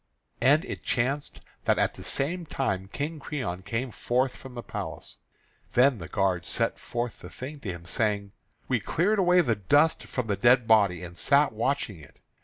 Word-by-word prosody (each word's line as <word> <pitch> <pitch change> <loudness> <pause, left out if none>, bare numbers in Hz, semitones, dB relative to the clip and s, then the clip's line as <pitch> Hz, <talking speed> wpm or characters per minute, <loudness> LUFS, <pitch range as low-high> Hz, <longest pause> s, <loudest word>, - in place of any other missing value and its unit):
And 145 +8 +4
it - - -6
chanced 135 +4 -1 0.2
that - - +3
at - - +1
the - - -11
same 165 +5 -1
time 95 -11 -2
King 150 +3 -3
Creon 125 - -4
came 115 +6 -3
forth 125 +4 0
from 130 -2 -11
the 120 - -6
palace. - - -6 0.6
Then 125 -1 +4
the 85 - -7
guard 95 -3 0
set - - 0
forth 120 -1 -4
the - - -10
thing 140 +3 -8
to 115 - -6
him, 85 -1 -9
saying: 100 +2 0 0.4
"We 125 -3 +1
cleared 195 - +1
away 180 -1 +5
the 120 -9 +1
dust 145 - +3
from 125 - -3
the 105 -2 0
dead 120 +3 +4
body, 100 -5 +4
and 85 0 -8
sat 140 -1 +4
watching 115 - -1
it. 70 - -16
125 Hz, 185 wpm, -27 LUFS, 100-140 Hz, 0.6 s, away